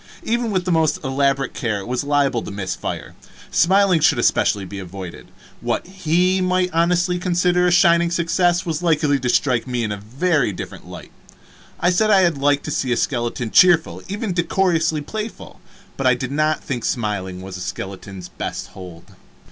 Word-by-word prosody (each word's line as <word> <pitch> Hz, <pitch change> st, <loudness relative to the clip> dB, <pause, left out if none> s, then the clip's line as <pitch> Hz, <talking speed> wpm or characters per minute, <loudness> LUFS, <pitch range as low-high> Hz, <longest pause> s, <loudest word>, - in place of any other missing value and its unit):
Even 235 Hz, 0 st, -1 dB
with 185 Hz, -3 st, -1 dB
the 185 Hz, -, 0 dB
most 160 Hz, -2 st, +2 dB
elaborate 135 Hz, 0 st, 0 dB
care 110 Hz, -4 st, -2 dB
it 100 Hz, -, -7 dB
was 125 Hz, +1 st, -2 dB
liable 140 Hz, -4 st, +1 dB
to -, -, -7 dB
miss 100 Hz, -2 st, -4 dB
fire. -, -, -6 dB, 0.4 s
Smiling 190 Hz, 0 st, +4 dB
should 145 Hz, -3 st, +3 dB
especially 105 Hz, -4 st, +1 dB
be 100 Hz, +2 st, -7 dB
avoided. 95 Hz, -1 st, -9 dB, 0.3 s
What -, -, -2 dB
he 185 Hz, 0 st, +1 dB
might 185 Hz, 0 st, +1 dB
honestly 175 Hz, +2 st, +1 dB
consider 180 Hz, 0 st, +2 dB
a -, -, +2 dB
shining 170 Hz, -1 st, +4 dB
success 175 Hz, +1 st, +1 dB
was 165 Hz, -1 st, -2 dB
likely 150 Hz, -4 st, +2 dB
to 125 Hz, -1 st, -2 dB
strike 125 Hz, -1 st, +1 dB
me 125 Hz, -2 st, -2 dB
in 110 Hz, -, -2 dB
a 105 Hz, -, -3 dB
very 130 Hz, -, 0 dB
different -, -, -8 dB
light. -, -, -10 dB, 0.7 s
I 175 Hz, +2 st, +2 dB
said 215 Hz, +4 st, +2 dB
I 190 Hz, -4 st, +5 dB
liked 145 Hz, -2 st, 0 dB
to 150 Hz, -, -4 dB
see 130 Hz, -3 st, -1 dB
a 120 Hz, -, +1 dB
skeleton 120 Hz, -2 st, -2 dB
cheerful, 175 Hz, -3 st, +4 dB
even 205 Hz, 0 st, -3 dB
decorously 170 Hz, -3 st, +1 dB
playful, 215 Hz, +8 st, -7 dB, 0.4 s
but 135 Hz, -, 0 dB
I 125 Hz, -, +5 dB
did 130 Hz, +1 st, -5 dB
not 155 Hz, +2 st, 0 dB
think 125 Hz, -5 st, -4 dB
smiling 95 Hz, -5 st, -3 dB
was 95 Hz, -1 st, -8 dB
a 90 Hz, -, -7 dB
skeleton's 95 Hz, 0 st, -7 dB
best -, -, -6 dB
hold. 90 Hz, -3 st, -12 dB
150 Hz, 180 wpm, -20 LUFS, 120-180 Hz, 0.7 s, I